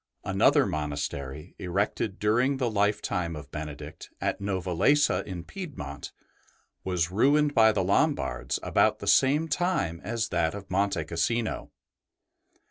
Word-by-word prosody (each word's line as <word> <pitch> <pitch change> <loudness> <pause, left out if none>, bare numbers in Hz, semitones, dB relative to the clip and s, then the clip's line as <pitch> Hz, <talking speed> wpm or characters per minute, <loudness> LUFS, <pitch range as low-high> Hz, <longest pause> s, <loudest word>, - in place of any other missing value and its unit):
Another 130 +9 +4
monastery, 75 -1 -4
erected 95 +2 -1
during 120 +6 +2
the 125 -3 0
lifetime 100 -5 0
of 75 -1 -9
Benedict 75 +1 -7
at - - -2
Novalesa 100 - +2
in 90 -4 -5
Piedmont, 130 - -7 0.7
was 90 -2 -1
ruined 145 +8 +3
by 110 -3 +6
the 100 -3 0
Lombards 90 - 0
about - - +3
the - - -8
same 145 +4 +4
time 145 - -1
as 110 +2 -2
that 85 0 0
of 100 -2 -9
Monte 100 -3 +1
Cassino. 110 +8 -1
95 Hz, 125 wpm, -27 LUFS, 80-120 Hz, 0.7 s, by